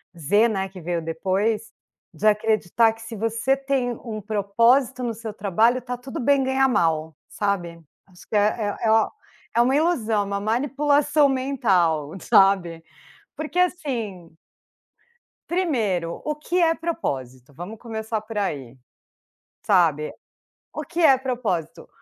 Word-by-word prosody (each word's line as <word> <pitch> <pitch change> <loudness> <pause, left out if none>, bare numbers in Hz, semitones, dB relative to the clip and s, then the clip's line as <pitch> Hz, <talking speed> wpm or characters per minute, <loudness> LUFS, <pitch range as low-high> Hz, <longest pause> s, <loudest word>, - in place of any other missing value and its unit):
Z, 205 +8 +3
né, 195 -2 -2
que 190 - -11
veio 170 0 -2
depois. 190 +7 -1 0.4
De 215 - 0
acreditar 215 +1 +2
que, 225 - -15
se 225 0 -8
você 230 +5 0
tem 270 -2 -1
um 215 -3 -5
propósito 230 +6 +2
no 235 - -1
seu 220 -1 -7
trabalho, 220 +5 +2
tá 250 0 -5
tudo 255 +2 -7
bem 275 +2 +3
ganhar 265 0 +2
mal, 160 - 0
sabe. 175 -5 -3 0.3
Acho 180 -2 -18
que - - -3
é 210 0 +1
é 225 - 0 0.7
é 235 - +5
uma 255 +3 +3
ilusão, 255 -10 +1
é - - -2
uma 200 0 -2
manipulação 285 +6 +2
mental, 195 - +1
sabe, 180 -4 +3 0.5
porque 310 +3 -3
assim 230 - -2 1.1
primeiro, 220 - -1
o 300 - -2
que 345 +4 -1
é 330 -1 +4
propósito? 135 - -5
Vamos 180 +9 -8
começar 220 -1 -4
por 215 0 -8
aí, 135 - -3 0.9
sabe. 160 -6 +2 0.6
O 310 - -4
que 330 +3 -6
é 280 -5 +6
propósito? 235 - -3
220 Hz, 135 wpm, -23 LUFS, 185-265 Hz, 1.1 s, é